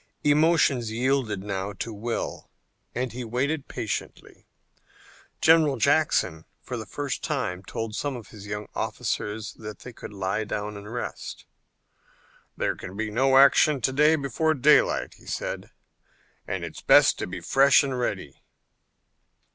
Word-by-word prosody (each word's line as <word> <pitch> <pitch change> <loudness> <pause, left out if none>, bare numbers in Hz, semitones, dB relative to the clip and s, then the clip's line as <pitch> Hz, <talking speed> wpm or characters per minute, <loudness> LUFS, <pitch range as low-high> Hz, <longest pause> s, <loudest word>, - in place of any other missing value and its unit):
Emotions 145 -5 +3
yielded 120 -4 0
now 100 -1 -3
to 110 +4 -5
will 115 +3 -4 0.5
and 125 0 -2
he 125 +1 -5
waited 135 +6 -1
patiently. 115 -4 -6 0.9
General 160 -4 +5
Jackson 130 - +2
for - - -6
the - - -6
first - - -4
time 90 +1 -2
told 110 +3 -5
some 145 +1 -2
of 115 -5 -9
his 105 -1 -11
young 105 0 -5
officers 105 +1 -3
that 105 -2 -9
they 125 - -9
could - - -9
lie 100 +2 -2
down 105 0 -4
and 100 +1 -9
rest. 120 - -6 1.1
"There - - 0
can 95 - -9
be 110 0 -2
no 130 +4 +3
action 140 +1 +6
before 150 +3 +2
daylight," 145 +2 +3
he - - -18
said, - - -4 0.8
"and - - -3
it's - - -9
best - - +5
to - - -3
be 90 0 -6
fresh 135 +12 +5
and 135 -2 -2
ready." 95 - -3
120 Hz, 140 wpm, -26 LUFS, 105-140 Hz, 1.1 s, action